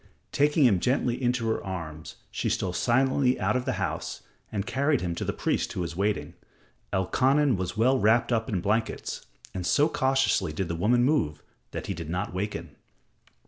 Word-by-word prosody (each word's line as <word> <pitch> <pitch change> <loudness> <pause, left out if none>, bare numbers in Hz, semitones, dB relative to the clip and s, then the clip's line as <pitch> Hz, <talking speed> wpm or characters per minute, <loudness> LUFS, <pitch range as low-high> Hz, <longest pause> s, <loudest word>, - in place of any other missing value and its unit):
Taking 145 0 +3
him 100 -7 +4
gently 125 +2 0
in 120 -1 +3
her 115 -3 -1
arms, 80 -4 -6 0.2
she - - -1
stole 90 -2 -1
silently 130 +4 +2
out - - +1
of 125 0 -1
the - - 0
house - - -3 0.3
and 100 -2 -2
carried 140 +2 +1
him 85 -2 -2
to - - -4
the - - -1
priest - - -1
who - - -3
was 85 -1 -4
waiting. 100 +3 -1 0.6
Elkanan 130 +8 +2
was 95 +2 -4
well 130 +4 +3
wrapped 115 +3 +3
up 115 -1 0
in 95 -5 -1
blankets, 110 +4 -2 0.3
and 95 - -4
so 115 - +3
cautiously 130 - +1
did 85 +2 -3
the 85 - -1
woman 115 +8 +3
move 80 - +1 0.3
that - - -6
he - - -2
did 80 -2 -7
not 90 +1 -2
waken. 105 +3 -4
110 Hz, 185 wpm, -27 LUFS, 90-130 Hz, 0.6 s, him